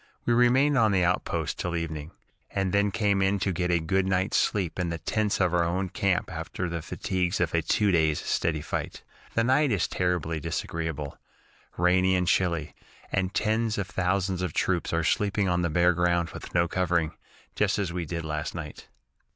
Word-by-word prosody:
We 120 - +3
remained 130 +4 +4
on 110 -2 +4
the 95 -2 +3
outposts 90 +1 0
till 90 -1 -3
evening, 80 -2 -4 0.4
and 95 -2 -1
then 100 0 +3
came 100 -1 +1
in 95 +1 +2
to 95 0 0
get 90 +1 -1
a 85 -1 +3
good 95 +4 0
night's 95 +1 +1
sleep 95 -4 0
in 90 -2 0
the 85 - -3
tents 105 +5 -1
of 90 -2 +2
our 85 -1 +3
own 90 +3 -1
camp 95 -1 0
after 85 +2 -4
the 85 -1 -3
fatigues 90 +3 -2
of 85 -2 0
a 85 - +2
two 105 +5 +2
days' 80 -3 +2
steady 80 -2 -1
fight. 80 - -4 0.3
The 115 - +3
night 130 +3 +3
is 100 - +1
terribly 90 -3 -1
disagreeable 75 -1 -4 0.6
rainy 90 +1 +3
and 90 -1 0
chilly 85 -5 +1 0.4
and 95 -1 0
tens 110 +1 0
of 100 - -1
thousands 95 -1 -1
of 90 -5 -2
troops 90 -3 0
are 85 0 +1
sleeping 100 +3 +1
on 90 -1 +1
the 85 - 0
bare 85 +3 +3
ground 85 -1 +1
with - - -9
no 85 0 +3
covering, 85 -3 0 0.4
just 105 0 +1
as 95 -5 -2
we 90 -2 -3
did 85 0 -4
last 75 +1 -3
night. 80 -4 -7
90 Hz, 190 wpm, -27 LUFS, 85-100 Hz, 0.6 s, remained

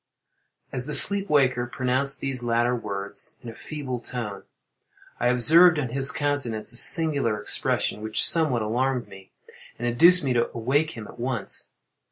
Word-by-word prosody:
As 125 +2 -4
the 150 - -2
sleep 200 0 +6
waker 130 -4 +1
pronounced 130 +2 -2
these 135 -2 -4
latter 120 +1 -1
words, 100 -4 -7
in 120 - -9
a - - -14
feeble 130 -1 -7
tone, 115 -5 -7 0.8
I 120 - 0
observed 160 +8 +4
on 135 -5 -3
his 135 +3 +2
countenance 125 -6 -3
a - - -9
singular 140 -9 +5
expression, 105 0 -3
which 110 0 +2
somewhat 150 -9 +1
alarmed 125 +2 -2
me, 95 -1 -15 0.5
and 120 - -4
induced 170 +9 +4
me 130 -2 -1
to 120 -1 -1
awake 135 +6 -2
him 110 - -8
at - - -15
once. 120 -5 -2
125 Hz, 160 wpm, -23 LUFS, 115-145 Hz, 0.8 s, sleep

